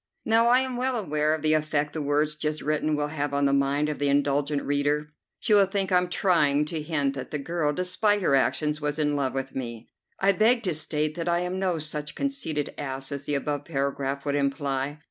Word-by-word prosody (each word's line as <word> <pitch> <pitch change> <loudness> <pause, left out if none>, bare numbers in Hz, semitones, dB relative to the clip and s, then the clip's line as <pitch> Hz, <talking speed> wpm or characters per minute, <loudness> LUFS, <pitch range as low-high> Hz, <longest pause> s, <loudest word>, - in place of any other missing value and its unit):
Now, 225 +1 +4
I 250 +2 +5
am 260 -2 -3
well 255 +1 0
aware 155 -7 +1
of 155 - -8
the 155 0 +3
effect 150 -1 0
the 155 - -3
words 150 +1 +1
just 150 0 -3
written 155 0 0
will 150 0 -1
have 145 -2 -2
on 140 0 +2
the 140 - +3
mind 140 +2 +2
of 150 - -3
the 145 - +1
indulgent 145 +1 +1
reader. 145 +1 0 0.3
She 220 - +1
will 200 -2 +6
think 195 0 -2
I'm 180 0 +3
trying 150 -7 +2
to 160 -1 -3
hint 145 -3 0
that 135 -2 -6
the 150 - -2
girl, 150 +1 -1
despite 185 +5 0
her 140 - +2
actions, 150 +2 +1
was 150 0 -2
in 150 -1 +1
love 135 -2 -1
with 135 0 -4
me. 120 -3 -6 0.3
I 195 +1 +4
beg 230 +5 +3
to 180 -4 0
state 155 0 -1
that 170 +1 -3
I 170 0 +2
am 180 +1 -2
no 185 -3 0
such 150 -1 -5
conceited 220 - -2
ass 135 -1 -4
as 140 0 -4
the 145 - 0
above 145 +1 -2
paragraph 140 0 -2
would 145 - 0
imply. 140 0 -1
150 Hz, 220 wpm, -26 LUFS, 140-175 Hz, 0.3 s, will